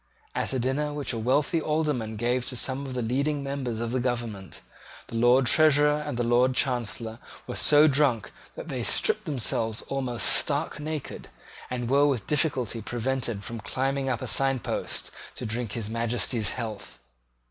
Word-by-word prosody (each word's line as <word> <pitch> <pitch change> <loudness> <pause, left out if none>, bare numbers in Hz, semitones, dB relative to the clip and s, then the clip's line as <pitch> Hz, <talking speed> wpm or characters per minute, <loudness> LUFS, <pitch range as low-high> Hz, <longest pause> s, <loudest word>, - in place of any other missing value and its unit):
At - - -2
a 135 - 0
dinner 135 +4 -1
which 145 -4 -3
a 115 - -3
wealthy 140 +7 +1
Alderman 150 -8 -1
gave 120 +3 0
to 125 - -2
some 135 +3 0
of 130 - -6
the 125 - -1
leading 140 +5 0
members 135 -5 -3
of 115 0 -2
the 130 - 0
government, 120 -6 -4 0.5
the - - -7
Lord 120 +3 +4
Treasurer 150 +1 +4
and 145 -5 -4
the 120 - 0
Lord 125 +2 +3
Chancellor 115 -3 -1 0.3
were - - -6
so 150 +1 +6
drunk 135 -6 +2 0.2
that - - -8
they - - -3
stripped - - +1
themselves 115 -5 -1
almost 130 -3 -2
stark 145 +1 +2
naked, 155 -1 -5 0.4
and 125 -1 -3
were 140 +3 +4
with 130 -7 -1
difficulty 130 -7 0
prevented 120 -2 -2
from 115 +2 -6
climbing 135 +4 -1
up 120 -3 -2
a - - -4
signpost 135 -2 0 0.2
to - - -6
drink 115 -1 -2
His 115 -3 -3
Majesty's 115 0 0
health. 110 -4 -6
125 Hz, 170 wpm, -27 LUFS, 115-140 Hz, 0.5 s, so